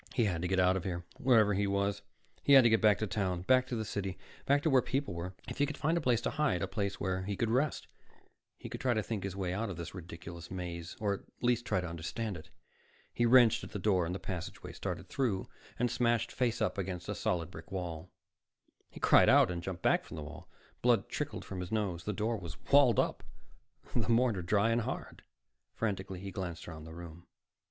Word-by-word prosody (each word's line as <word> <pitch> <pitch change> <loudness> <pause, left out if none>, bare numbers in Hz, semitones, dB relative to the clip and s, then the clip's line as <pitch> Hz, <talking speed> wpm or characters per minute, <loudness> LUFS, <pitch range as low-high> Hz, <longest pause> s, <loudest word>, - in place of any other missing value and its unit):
He 120 - +3
had 90 -5 -1
to 90 - -1
get 95 +1 +1
out 90 0 +4
of 95 - -2
here, 85 -2 -4
wherever 115 -5 +5
he 100 +1 +1
was. 100 0 0 0.4
He 140 - +4
had 135 -2 +10
to 120 - +5
get 110 - +4
back 105 -3 +5
to 110 - -1
town, 90 -3 -1
back 130 +5 +4
to 125 - -3
the 110 -1 -2
city, 100 -2 -3 0.3
back 145 +1 +3
to 160 - +3
where 130 -1 +6
people 135 -4 -2
were. 90 +2 -5
If - - -6
he 145 - +3
could 150 - -5
find 160 +3 +1
a 170 - +1
place 125 -4 +2
to - - -1
hide, 150 - +1
a - - 0
place 100 0 -2
where 95 -1 -1
he 100 +2 -3
could 115 +3 0
rest, 140 +5 +1 0.7
he - - -8
could - - -6
try 125 -3 +2
to 110 - 0
think 105 -3 -3
his 95 -1 -4
way 95 -2 -2
out 105 +3 -2
of 90 - -6
this 85 -2 -6
ridiculous 85 -1 -9
maze, 85 -2 -6
or 105 -2 +1
at 100 - -4 0.2
least 120 0 +2
try 95 - +1
to 90 - -4
understand 90 +6 -4
it. 80 0 -10 0.6
He 120 - +2
wrenched 120 -2 +6
at - - -9
the - - -2
door 95 -3 +2
to - - -3
the - - -2
passageway, 90 -4 -6
started - - -5
through, 115 -8 -1 0.3
and 120 -1 +1
smashed 120 -1 +1
face 125 -3 0
up - - -1
against 90 -2 -4
a - - -1
solid 85 -1 -1
brick - - -11
wall. 90 -2 -4 0.8
He - - -11
cried - - +6
out - - +6
and 85 -1 -3
jumped 90 -1 -6
back - - +3
from - - -9
the 75 - -5
wall. 80 +3 -10 0.3
Blood - - +3
trickled - - -4
from 95 - -6
his 90 -1 -5
nose. 95 -6 -1
The 105 - 0
door 110 +3 -1
was 85 -5 -8
walled 140 -6 +6
up, - - +1 0.7
the - - +1
mortar 115 -4 +3
dry 100 +6 +2
and 115 +1 +2
hard. - - -5 0.5
Frantically, 95 -4 -3
he 100 0 -6
glanced 90 -3 -5
around 80 -2 -8
the 80 0 -10
room. 85 0 -10
100 Hz, 235 wpm, -32 LUFS, 90-115 Hz, 0.8 s, had